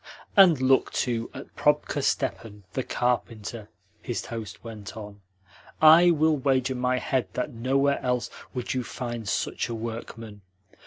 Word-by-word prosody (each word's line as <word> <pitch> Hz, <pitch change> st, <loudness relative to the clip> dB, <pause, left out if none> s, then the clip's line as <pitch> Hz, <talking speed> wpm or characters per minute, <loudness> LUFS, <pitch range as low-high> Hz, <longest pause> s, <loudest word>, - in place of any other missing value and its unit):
"And 185 Hz, -, +7 dB
look, 130 Hz, 0 st, +3 dB
too, 115 Hz, -2 st, -1 dB
at -, -, -11 dB
Probka -, -, +1 dB
Stepan, 105 Hz, -3 st, -2 dB
the 130 Hz, -, -1 dB
carpenter," 115 Hz, -3 st, -2 dB, 0.3 s
his 120 Hz, -, -4 dB
host 115 Hz, -3 st, -7 dB
went 110 Hz, -1 st, -9 dB
on. 105 Hz, -1 st, -9 dB, 0.6 s
"I 160 Hz, +3 st, +8 dB
will 160 Hz, -2 st, +3 dB
wager 130 Hz, -1 st, +1 dB
my 125 Hz, 0 st, 0 dB
head 130 Hz, -5 st, -1 dB
that 125 Hz, +3 st, -3 dB
nowhere 135 Hz, +4 st, +1 dB
else 125 Hz, -1 st, -1 dB, 0.2 s
would 125 Hz, -1 st, -2 dB
you 130 Hz, -1 st, -1 dB
find 120 Hz, -4 st, -5 dB
such -, -, -1 dB
a 115 Hz, -, -3 dB
workman. 115 Hz, -2 st, -7 dB
125 Hz, 145 wpm, -26 LUFS, 115-135 Hz, 0.6 s, I